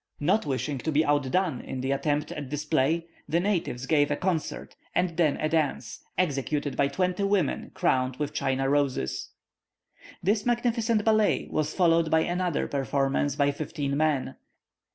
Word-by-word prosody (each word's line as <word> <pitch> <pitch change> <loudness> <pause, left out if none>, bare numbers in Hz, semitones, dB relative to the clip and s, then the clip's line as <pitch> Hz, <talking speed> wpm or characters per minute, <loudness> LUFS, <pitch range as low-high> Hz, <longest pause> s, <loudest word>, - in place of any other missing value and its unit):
Not 175 +4 +1
wishing 135 0 -2
to 160 - -2
be 155 +2 +3
out 145 -2 +1
done 180 -5 0
in 130 - -5
the 130 +1 -1
attempt 145 +1 0
at 145 -3 -6
display, 150 +2 0 0.2
the 170 - +2
natives 175 -10 -1
gave 145 -1 +3
a 145 - +1
concert, 180 -2 -3 0.2
and 180 -2 +1
then 155 -4 +2
a 155 - 0
dance, 155 -2 -1
executed 145 -3 -1
by 140 - +2
twenty 180 +6 -1
women 195 -6 0
crowned 130 0 +1
with 150 +2 -3
China 135 -2 0
roses. 140 - 0 0.9
This 205 +3 +2
magnificent 235 -2 +1
ballet 215 -1 +3
was 155 0 -1
followed 165 -3 +3
by 160 0 +4
another 175 -1 -1
performance 140 0 0
by 145 0 +2
fifteen 145 -1 -3
men. 150 -3 0
150 Hz, 155 wpm, -27 LUFS, 140-180 Hz, 0.9 s, by